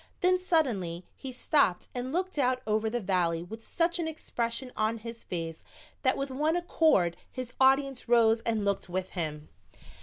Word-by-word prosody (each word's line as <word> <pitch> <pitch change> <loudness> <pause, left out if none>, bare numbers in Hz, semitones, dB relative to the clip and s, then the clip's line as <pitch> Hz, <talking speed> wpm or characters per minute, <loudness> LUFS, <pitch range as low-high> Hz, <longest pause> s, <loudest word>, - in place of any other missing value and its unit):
Then 365 0 +4
suddenly 225 - 0
he 265 - -7
stopped 250 - +2
and 250 +1 -3
looked 365 0 -1
out 255 -1 +2
over 215 +1 +1
the 240 +2 -1
valley 175 -5 0
with 225 +6 -9
such 340 +1 0
an 330 - -1
expression 250 -5 -3
on 220 +1 0
his 230 +1 -8
face 165 -2 -5 0.4
that 260 -1 +2
with 275 0 -3
one 305 +5 +1
accord 315 - +3
his 255 -2 -6
audience 270 -1 +3
rose 225 -1 +5
and 220 -3 0
looked 200 -2 -1
with 185 +1 -3
him. 155 -4 -4
235 Hz, 170 wpm, -29 LUFS, 190-275 Hz, 0.4 s, rose